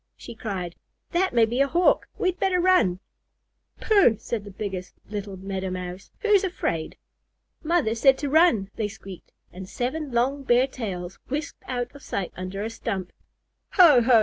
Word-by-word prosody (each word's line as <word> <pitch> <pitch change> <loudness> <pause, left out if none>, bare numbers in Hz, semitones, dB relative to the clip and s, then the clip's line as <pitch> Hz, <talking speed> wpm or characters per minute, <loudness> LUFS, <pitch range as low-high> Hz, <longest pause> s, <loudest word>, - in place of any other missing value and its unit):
she - - -9
cried. 195 -6 -4 0.4
"That 370 +2 +1
may 230 -2 +4
be 240 +4 0
a 280 - +4
Hawk. 345 +5 +3
We'd 370 -1 0
better 375 -2 +2
run." 345 - +3 0.8
"Pooh!" 395 - +4
said 225 -1 -4
the - - -8
biggest 190 -2 -6 0.2
little 205 -2 -5
Meadow 190 0 -4
Mouse. 180 +1 -6
"Who's 420 -3 +4
afraid?" 165 - -2 0.7
"Mother 310 -8 +2
said 265 +4 +4
to 290 - -3
run," 270 - +4
they 215 - 0
squeaked, 195 -3 -11 0.2
and 185 +1 -9
seven 275 +4 -3
long 255 +4 +1
bare 250 -1 +4
tails 190 -9 -6
whisked 290 +3 -4
out 245 -1 -3
of 285 - -13
sight 195 -7 -4
under 185 +2 -5
a 220 - -2
stump. 195 -5 -4 0.6
"Ho 320 - +7
ho!" 235 -1 +6
230 Hz, 165 wpm, -25 LUFS, 195-290 Hz, 0.8 s, Ho